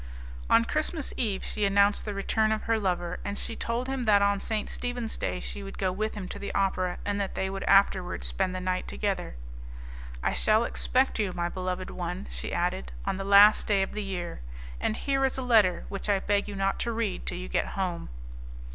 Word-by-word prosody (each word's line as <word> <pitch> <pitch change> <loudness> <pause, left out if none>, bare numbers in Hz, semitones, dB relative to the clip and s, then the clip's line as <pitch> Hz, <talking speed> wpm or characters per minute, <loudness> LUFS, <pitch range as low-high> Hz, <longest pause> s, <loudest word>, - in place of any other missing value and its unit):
On 230 0 +5
Christmas 310 +2 -1
Eve 210 -6 -1
she 210 - -3
announced 200 +1 +3
the 210 -2 -4
return 215 +2 +1
of 220 - -1
her 225 -1 +1
lover, 180 -3 -1
and 200 - -4
she 230 - -5
told 235 +2 -2
him 265 -2 -2
that 205 -2 +5
on 200 0 +2
St. 215 +1 -2
Stephen's 245 -2 -3
Day 180 - -2
she 205 - -6
would 195 0 -8
go 190 -2 0
with 215 +4 -2
him 195 -3 -5
to - - -6
the 200 - -4
opera, 185 -2 +1
and 205 0 0
that 195 - -3
they 190 0 -1
would 195 0 -4
afterwards 195 -2 +3
spend 185 -1 -1
the - - -2
night 185 0 -2
together. 195 - -2 0.9
"I - - +1
shall 220 +1 +3
expect 255 +1 +1
you, 200 -4 0
my 175 -1 -1
beloved 185 0 -4
one," 180 +2 -4
she - - -5
added, 180 +2 -1
"on 195 -1 -1
the 195 - -3
last 200 +2 +7
day 200 -2 +3
of - - -4
the 215 - -4
year, 180 - -4 0.4
and 220 - -1
here 275 -1 0
is 265 0 +1
a 260 - -2
letter 215 -8 +4
which 200 +1 -5
I 200 - +4
beg 205 +1 0
you 205 - -6
not 195 0 0
to 235 - -1
read 220 - -2
till - - -1
you - - -6
get - - 0
home." 180 -3 -2
200 Hz, 220 wpm, -28 LUFS, 185-220 Hz, 0.9 s, last